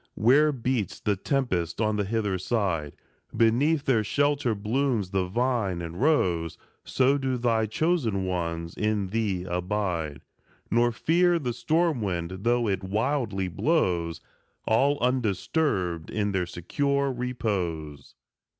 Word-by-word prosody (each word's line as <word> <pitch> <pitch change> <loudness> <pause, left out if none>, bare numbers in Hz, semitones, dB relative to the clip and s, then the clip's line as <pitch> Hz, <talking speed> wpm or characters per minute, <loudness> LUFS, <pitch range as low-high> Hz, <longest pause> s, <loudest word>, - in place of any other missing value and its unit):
Where 145 +7 +4
beats 125 - -2
the 105 - 0
tempest 95 - -1
on 110 -1 +1
the 105 -1 0
hither 105 -3 -1
side, 90 -8 -1 0.4
Beneath 135 +7 +3
their 115 -5 +3
shelter 140 +1 +1
blooms 110 -1 -1
the 95 -2 0
vine 115 -4 0
and 85 +3 -6
rose; 90 - +1 0.3
So 135 +2 +2
do 130 -2 -1
thy 115 -2 +1
chosen 115 - 0
ones 85 -2 -3
in 105 -3 -1
thee 100 -4 -1
abide, 90 -4 -2 0.5
Nor 120 +2 +3
fear 175 +8 +2
the 125 -7 -2
storm 160 -1 +1
wind 90 -2 -3
though 120 +1 +2
it 95 -2 -1
wildly 105 -1 -1
blows, 90 - 0 0.4
All 140 +6 +3
undisturbed 105 - 0
in 105 -1 -1
their 95 -3 -1
secure 140 +11 -1
repose. 95 - -3
110 Hz, 125 wpm, -26 LUFS, 90-130 Hz, 0.5 s, Where